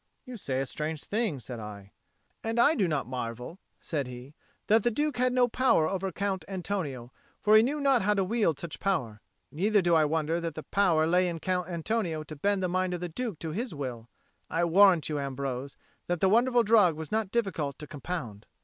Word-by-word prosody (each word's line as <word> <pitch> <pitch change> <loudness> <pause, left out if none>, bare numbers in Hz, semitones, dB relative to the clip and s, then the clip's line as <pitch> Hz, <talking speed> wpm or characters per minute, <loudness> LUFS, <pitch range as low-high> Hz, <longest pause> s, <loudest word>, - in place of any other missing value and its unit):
"You 255 -2 -8
say 135 - -3
a 135 - -1
strange 150 +3 -4
thing," 215 -8 -1
said 125 -1 -7
I. 100 -2 -9 0.5
"And 225 +1 -1
I 285 +6 +6
do 200 - +1
not 150 -4 -1
marvel," 125 - -6 0.2
said 145 -5 -3
he, 125 +3 -10 0.3
"that 220 +2 +4
the 240 - +2
Duke 295 +3 -1
had 250 0 +2
no 250 -1 +3
power 230 -9 +3
over 190 +1 -2
Count 190 -1 -2
Antonio, 175 -10 -4 0.3
for 210 +1 +5
he 215 - +9
knew 280 +6 0
not 275 -4 +3
how 210 +2 +2
to 195 - +2
wield 195 -6 +1
such 170 0 -7
power. 125 - -1 0.3
But 150 - -14
neither 205 +4 +3
do 175 -1 +2
I 160 -2 +5
wonder 160 +2 0
that 160 -2 -6
power 175 -6 +3
lay 180 +2 +3
in 170 -1 -3
Count 180 +1 -2
Antonio 170 -2 -2
to 155 0 -9
bend 200 +6 0
the - - +2
mind 185 0 0
of - - -5
the 175 0 -4
Duke 215 +1 -4
to 160 - -4
his 215 +1 -4
will. 120 -5 -6 0.4
I 165 +1 0
warrant 180 -1 +5
you, 150 -2 -2
Ambrose, 135 -1 -4 0.3
that 175 -1 -1
the 190 - +3
wonderful 240 +3 +4
drug 205 -7 +5
was 155 -1 -7
not 220 -2 0
difficult 190 -11 -1
to 150 - -8
compound." 140 - -6
175 Hz, 210 wpm, -28 LUFS, 150-210 Hz, 0.5 s, he